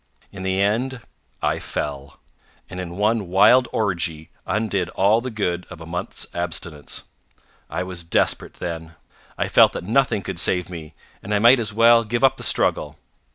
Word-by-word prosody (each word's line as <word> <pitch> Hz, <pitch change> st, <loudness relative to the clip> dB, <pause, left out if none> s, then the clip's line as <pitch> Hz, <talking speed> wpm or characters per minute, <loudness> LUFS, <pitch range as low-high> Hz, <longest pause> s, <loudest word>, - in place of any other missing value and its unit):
In 100 Hz, -, -9 dB
the 95 Hz, 0 st, -1 dB
end, 120 Hz, +6 st, 0 dB, 0.4 s
I -, -, +1 dB
fell, 70 Hz, -1 st, -5 dB, 0.5 s
and 90 Hz, -, -6 dB
in 90 Hz, -1 st, -6 dB
one 105 Hz, -1 st, +1 dB
wild 110 Hz, +8 st, +5 dB
orgy 85 Hz, -6 st, -2 dB, 0.2 s
undid 100 Hz, -5 st, -1 dB
all 105 Hz, +4 st, +3 dB
the 130 Hz, -, -4 dB
good 90 Hz, -6 st, -2 dB
of 95 Hz, -, -10 dB
a 80 Hz, -, -9 dB
month's 90 Hz, +2 st, -3 dB
abstinence. 85 Hz, -3 st, -4 dB, 0.7 s
I 90 Hz, -, -2 dB
was 90 Hz, -2 st, -6 dB
desperate 85 Hz, -, 0 dB
then. 80 Hz, -1 st, -6 dB, 0.4 s
I -, -, 0 dB
felt -, -, +5 dB
that -, -, -5 dB
nothing 110 Hz, 0 st, +1 dB
could 95 Hz, -3 st, -5 dB
save 90 Hz, 0 st, +1 dB
me, 80 Hz, -3 st, -9 dB, 0.3 s
and 105 Hz, +2 st, -2 dB
I -, -, +4 dB
might 120 Hz, +5 st, +6 dB
as 110 Hz, -2 st, -2 dB
well 115 Hz, +2 st, +5 dB
give 120 Hz, +3 st, -2 dB
up 135 Hz, 0 st, +4 dB
the -, -, -6 dB
struggle. -, -, +1 dB
95 Hz, 170 wpm, -22 LUFS, 85-110 Hz, 0.7 s, might